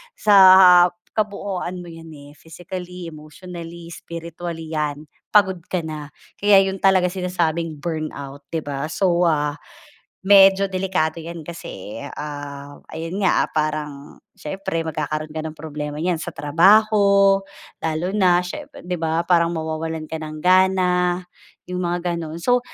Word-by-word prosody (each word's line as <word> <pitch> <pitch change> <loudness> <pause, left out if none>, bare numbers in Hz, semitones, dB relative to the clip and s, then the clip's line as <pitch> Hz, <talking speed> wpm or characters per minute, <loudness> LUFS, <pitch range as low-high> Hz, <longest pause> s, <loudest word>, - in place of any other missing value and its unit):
sa 210 - +2 0.8
kabuuan 200 -4 -3
mo 175 - -10
'yan, 165 0 -11
eh. 145 0 -13
Physically, 180 +1 -8
emotionally, 170 +2 -10
spiritually 170 -1 -7
'yan, 150 -1 -2 0.3
pagod 190 -3 +4
ka 180 -2 -1
na. 155 -2 -6 0.3
Kaya 205 -1 +6
'yun 190 0 -2
talagang 185 -2 +3
sinasabing 170 -3 -2
burnout, 145 -4 -5
'di 160 - -1
ba. 140 0 -4
So, 175 0 +1
ah, 150 -2 0 0.6
medyo 195 0 +6
delikado 185 -4 -1
'yan 170 +1 -7
kasi, 115 - -8
ah, 145 -1 -8
ayun 165 +5 -4
nga, 190 - +2
parang 150 -2 -3 0.2
siyempre 165 0 -4
magkakaroon 155 0 -3
ka 155 - -4
ng 155 0 -8
problema 150 -1 -6
niyan 175 -2 0
sa 170 -1 -6
trabaho, 200 +4 +4 0.4
lalo 160 +2 -2
na 180 -4 +3
siyempre 180 - -8
'di 180 0 -3
ba 165 0 0
parang 170 -1 +2
mawawalan 160 0 -4
ka 160 - -3
ng 155 -1 -7
gana, 180 -1 +3 0.5
'yong 180 0 -3
mga 175 0 -1
ganun. 160 -1 -6
So, 245 +6 +3
170 Hz, 135 wpm, -21 LUFS, 155-185 Hz, 0.8 s, Kaya